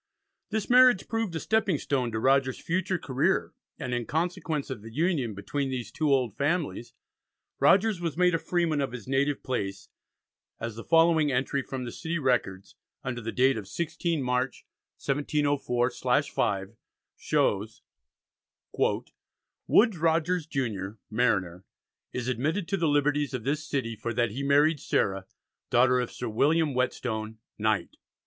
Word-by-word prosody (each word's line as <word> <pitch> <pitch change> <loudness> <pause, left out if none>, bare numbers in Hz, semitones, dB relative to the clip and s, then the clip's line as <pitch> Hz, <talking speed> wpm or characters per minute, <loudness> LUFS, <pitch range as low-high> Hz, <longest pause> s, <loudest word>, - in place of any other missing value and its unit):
This 220 -1 -2
marriage 250 -4 +6
proved 225 -6 -2
a - - -1
stepping 215 -6 +1
stone 130 -4 -1
to 110 - -2
Rogers's 135 +1 +2
future 185 +2 0
career, 145 +5 0 0.2
and 130 -4 -4
in 120 -2 -2
consequence 160 -3 -2
of 120 -6 -5
the 115 +1 -10
union 145 - 0
between 135 +8 -3
these 120 -4 -4
two 155 +3 0
old 125 -6 +2
families 145 -5 -2 0.6
Rogers 200 -2 +4
was 165 -3 -3
made 180 0 +4
a 165 - +1
freeman 170 -4 0
of 135 -3 -2
his 125 -3 -8
native 140 +2 0
place, 100 -6 -3 0.7
as 115 -1 -4
the 115 - -7
following 165 -2 +4
entry 135 +2 0
from 130 -1 -5
the 120 - -5
city 170 +5 -3
records, 120 - -1 0.3
under 120 -2 -4
the 115 +1 -4
date 130 0 +3
of 105 - -5
16th 165 - -2
March, 125 +1 -1 0.3
1704/5, 135 -8 0 0.4
shows: 105 +2 0 0.9
"Woodes - - 0 0.9
Rogers 165 +1 +1
junior, 110 -8 -3
Mariner, 95 -6 0 0.5
is 125 -1 -4
admitted 155 - -1
to 195 - +1
the 165 -3 +1
liberties 145 -1 +1
of 120 - -4
this 145 +5 -1
city 130 -6 -2
for 115 +1 -4
that 120 -3 +1
he 130 +6 -4
married 145 +2 +3
Sarah, 95 -9 0 0.4
daughter 125 +1 +4
of 125 - -2
Sir 125 - -5
William 145 +7 +2
Whettstone, 110 -3 -2 0.2
knight." 110 -1 0
135 Hz, 145 wpm, -28 LUFS, 120-160 Hz, 0.9 s, marriage